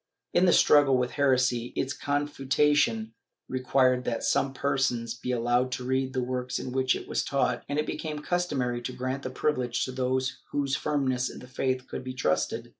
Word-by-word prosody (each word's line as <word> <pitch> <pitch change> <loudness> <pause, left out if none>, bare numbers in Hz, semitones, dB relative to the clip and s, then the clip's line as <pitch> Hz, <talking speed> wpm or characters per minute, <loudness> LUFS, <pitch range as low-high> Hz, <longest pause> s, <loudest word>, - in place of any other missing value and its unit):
In 185 - +4
the - - +6
struggle 145 -5 +5
with 125 -1 0
heresy, 125 -4 +1
its 135 +1 -1
confutation 145 -5 +1 0.3
required 130 0 +2
that 115 - -2
some 135 - +1
persons 135 -4 0
should 120 - -15
be 125 - -2
allowed 120 +1 +1
to 125 - -4
read 130 +1 -1
the 130 -2 0
works 125 0 -2
in 125 - -5
which 130 0 +2
it - - -7
was - - -1
taught, 130 -3 0
and 145 - -1
it 150 - +1
became 155 -2 -4
customary 135 -9 -1
to 125 +1 -5
grant 130 +2 -3
the 130 - -4
privilege 130 -2 -1
to 130 - -5
those 130 +1 -1
whose 140 -2 0
firmness 130 -2 0
in - - -10
the 125 - -11
faith 130 0 -2
could - - -6
be 130 0 -6
trusted. 105 -12 -1
130 Hz, 190 wpm, -28 LUFS, 125-140 Hz, 0.3 s, the